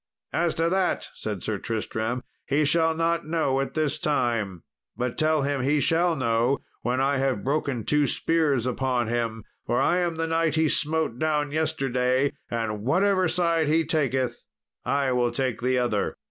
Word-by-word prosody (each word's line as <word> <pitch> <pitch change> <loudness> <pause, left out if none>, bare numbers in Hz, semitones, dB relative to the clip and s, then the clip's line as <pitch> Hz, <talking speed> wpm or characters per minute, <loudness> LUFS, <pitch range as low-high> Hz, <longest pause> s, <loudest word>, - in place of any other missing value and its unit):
"As 165 +2 +1
to 165 +1 +1
that," 185 +1 0
said 105 -4 -5
Sir 105 -3 -2
Tristram, 115 +3 -3 0.2
"he 150 +2 +2
shall 160 +2 +3
not 165 0 0
know 155 -5 +1
at 135 - -4
this 155 -2 0
time, 115 - -1 0.3
but 125 0 -2
tell 155 -2 +2
him 140 -1 -1
he 145 +3 +2
shall 165 +4 +2
know 120 +1 +1 0.2
when 125 +1 0
I 135 +1 +2
have 130 -6 0
broken 140 -4 -1
two 150 -1 +2
spears 150 -8 +1
upon 125 -2 0
him, 115 -2 -2 0.2
for 120 - +1
I 175 +6 +3
am 175 -2 0
the 165 0 -1
knight 165 -1 +1
he 160 -1 +3
smote 155 -6 0
down 150 -2 0
yesterday, 135 -3 0 0.2
and 110 -3 -2
whatever 185 - +2
side 165 -2 +1
he 160 +2 +2
taketh, 130 -6 0 0.4
I 140 -2 +1
will 125 -1 +2
take 125 0 -2
the 130 +1 +1
other." 120 -5 0
140 Hz, 170 wpm, -25 LUFS, 120-160 Hz, 0.4 s, shall